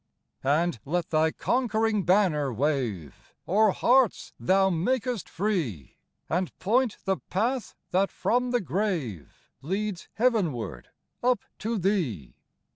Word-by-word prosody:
71 145 +5 +3
And 175 -10 -3
let 170 +3 -2
Thy 160 0 +3
conquering 220 0 0
banner 175 -8 +3
wave 120 - -2
O'er 215 +4 +4
hearts 245 +3 +2
Thou 190 +1 +3
makest 235 +4 -1
free, 160 - -2 0.3
And 180 +1 -2
point 235 +4 +1
the 190 -1 +1
path 235 +6 -1 0.2
that 195 +2 +2
from 250 +1 0
the 245 0 +1
grave 160 - -3
Leads 195 +4 -3
heavenward 175 - 0 0.3
up 250 0 +2 0.2
to 225 +1 -2
Thee. 170 - -1
190 Hz, 120 wpm, -27 LUFS, 150-220 Hz, 0.3 s, O'er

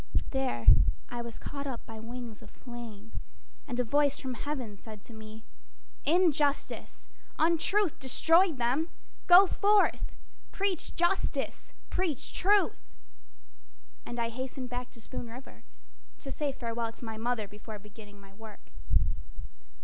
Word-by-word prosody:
There 265 - -1 0.4
I 240 0 -4
was 235 -1 -7
caught 280 0 -5
up 250 -4 -5
by 225 -1 -8
wings 235 -1 -7
of - - -12
flame, 230 -4 -9 0.6
And 250 -2 -3
a - - +4
voice 285 +3 +3
from 260 -2 -4
heaven 250 -5 -4
said 215 +1 -11
to 235 - -11
me: 220 0 -10 0.6
"Injustice, 300 -3 +1 0.3
Untruth 335 +3 +2
destroyed 325 +5 +4
them. 255 +8 +1 0.4
Go 360 +2 +10
forth 410 +2 +3 0.4
Preach 390 -4 -1
Justice! 345 +3 0 0.2
Preach 350 -7 -1
Truth!" 395 - +2 1.1
And 240 - -6
I 230 -1 0
hastened 255 +1 -5
back 245 0 -4
to 230 - -14
Spoon 240 +1 -6
River 230 - -11 0.6
To - - -7
say 295 -2 -1
farewell 230 -2 -3
to 235 - -9
my 220 -1 -5
mother 225 -2 -1
before 210 +2 -9
beginning 205 0 -14
my 195 -1 -16
work. 220 +1 -13
245 Hz, 135 wpm, -30 LUFS, 225-300 Hz, 1.1 s, Go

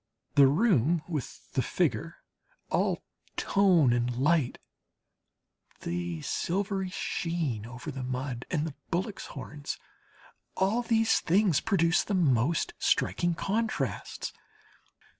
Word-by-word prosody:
The 140 -2 +7
room 165 - +3
with 155 -8 -5
the - - +2
figure, - - -1 0.5
all - - +1 0.3
tone 180 -10 +4
and 120 0 0
light, 145 0 +2 1.2
the 85 -2 -3
silvery 195 +1 -1
sheen 160 - -2
over 125 +5 -7
the 135 -1 -6
mud 125 -1 -3
and 155 -3 0
the 160 - -4 0.2
bullocks' 190 +4 -2
horns 145 +1 -6 0.8
all 200 +6 +2
these 225 -1 +3
things 185 -3 +3
produce 175 -6 +2
the 205 - -1
most 150 -2 +2
striking 175 -1 +1
contrasts. 195 - -2
160 Hz, 105 wpm, -29 LUFS, 130-190 Hz, 1.2 s, The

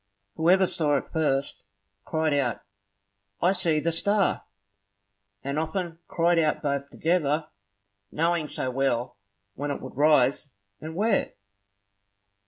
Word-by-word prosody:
Whoever 180 +4 +4
saw 150 -5 +1
it - - -6
first, 140 -4 0 0.4
cried 160 -1 0
out, 130 -5 0 0.8
"I 180 - +3
see 175 -5 +1
the 170 +2 0
star!" 200 +4 +1 1.0
And 140 +2 -2
often 175 +3 -2
they 165 - -23
cried 170 0 +2
out 155 -1 +1
both 140 -1 -1
together, 155 -2 0 0.6
knowing 165 0 0
so 130 -3 -3
well 125 -3 -1 0.4
when 145 +5 -4
it 140 - -3
would 130 - -9
rise, 145 -1 +3 0.3
and 160 +1 -7
where. 210 +2 +1
155 Hz, 125 wpm, -26 LUFS, 140-170 Hz, 1.0 s, Whoever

